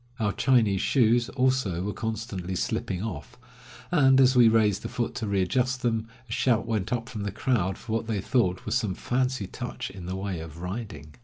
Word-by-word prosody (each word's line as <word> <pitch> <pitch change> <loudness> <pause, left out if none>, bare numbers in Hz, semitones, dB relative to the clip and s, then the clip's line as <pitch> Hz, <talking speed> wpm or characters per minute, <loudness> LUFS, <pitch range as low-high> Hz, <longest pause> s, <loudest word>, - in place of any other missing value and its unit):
Our 105 -2 +1
Chinese 115 -7 +3
shoes, 120 -2 +3
also, 130 -9 +1
were 105 +1 -2
constantly 110 -5 -4
slipping 90 +1 -2
off, 110 -4 -6 0.5
and 135 -6 +5
as 130 0 +5
we 120 -2 +7
raised 110 -3 +3
the - - -5
foot 120 -2 -2
to 110 - -2
readjust 125 +7 0
them, 115 -2 0 0.2
a - - -12
shout 115 -1 +2
went 110 -3 -2
up 115 -2 -1
from 110 -5 -6
the 100 0 -2
crowd 95 -3 0
for 110 - -9
what 115 0 -1
they 110 -3 -1
thought 95 -3 0
was - - -2
some 110 -7 0
fancy 125 -2 -1
touch - - -6
in 90 -3 -9
the 95 - -3
way 95 -2 -3
of 80 0 -9
riding. 90 -5 -6
110 Hz, 200 wpm, -27 LUFS, 95-125 Hz, 0.5 s, we